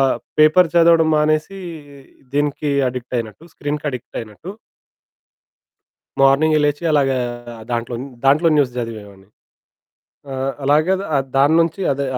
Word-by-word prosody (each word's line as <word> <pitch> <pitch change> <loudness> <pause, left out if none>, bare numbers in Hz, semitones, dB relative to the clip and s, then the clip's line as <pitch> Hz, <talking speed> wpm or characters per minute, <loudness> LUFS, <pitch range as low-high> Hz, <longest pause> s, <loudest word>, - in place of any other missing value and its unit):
ఆహ్, 135 -1 +2 0.2
పేపర్ 155 +3 +5
చదవడం 165 -1 +5
మానేసీ, 155 +5 0 0.8
దీనికి 145 0 -1 0.2
అడిక్టయినట్టు, 125 +1 -5
స్క్రీన్‌కడిక్టయినట్టు. 145 - -6 1.7
మార్నింగే 145 +3 +4
లేచి 145 +3 -1
అలాగా 140 -3 +2 0.5
దాంట్లోన్ 120 +1 -3 0.2
దాంట్లోని 155 +4 +4
న్యూస్ 135 -4 +2
జదివేవాడిని. 105 -5 -7 1.0
ఆ! - - -5 0.3
అలాగే 155 +6 +3
ద - - -5
ఆహ్, 135 -1 +1
దాని 140 +3 +4
నుంచి 165 +3 -1
అదే, 140 +1 -3
145 Hz, 105 wpm, -19 LUFS, 125-155 Hz, 1.7 s, పేపర్